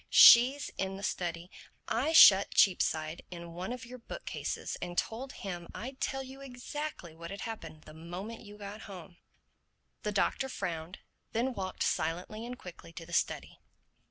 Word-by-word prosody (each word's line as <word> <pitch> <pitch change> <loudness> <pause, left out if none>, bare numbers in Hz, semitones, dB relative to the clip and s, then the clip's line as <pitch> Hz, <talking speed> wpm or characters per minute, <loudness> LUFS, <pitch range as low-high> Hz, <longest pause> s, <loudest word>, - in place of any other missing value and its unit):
She's 260 +4 +8
in 195 0 -2
the 200 - -9
study. 175 -1 -3 0.4
I 265 +7 +1
shut 200 -11 +8
Cheapside 160 -3 +3
in 170 -1 -8
one 180 +5 -4
of 250 -1 -6
your 250 +1 -10
book - - -8
cases - - -3
and 175 0 -5
told 255 +4 -2
him 175 -3 -6
I'd 260 +4 -7
tell 270 0 -1
you 265 +1 -11
exactly 260 - -6
what 170 +1 -8
had 200 - -6
happened 165 -9 -7
the 155 - -13
moment 180 +8 -7
you 205 0 -12
got 205 +1 -8
home." 180 -2 -10 0.8
The 210 - -2
Doctor 265 +6 +1
frowned, 170 -5 -4 0.3
then 245 +3 0
walked 190 -4 -3
silently 180 +8 -2
and 250 +1 -6
quickly 175 -4 -11
to 165 0 -8
the 170 - -11
study. - - -1
195 Hz, 165 wpm, -31 LUFS, 170-245 Hz, 0.8 s, She's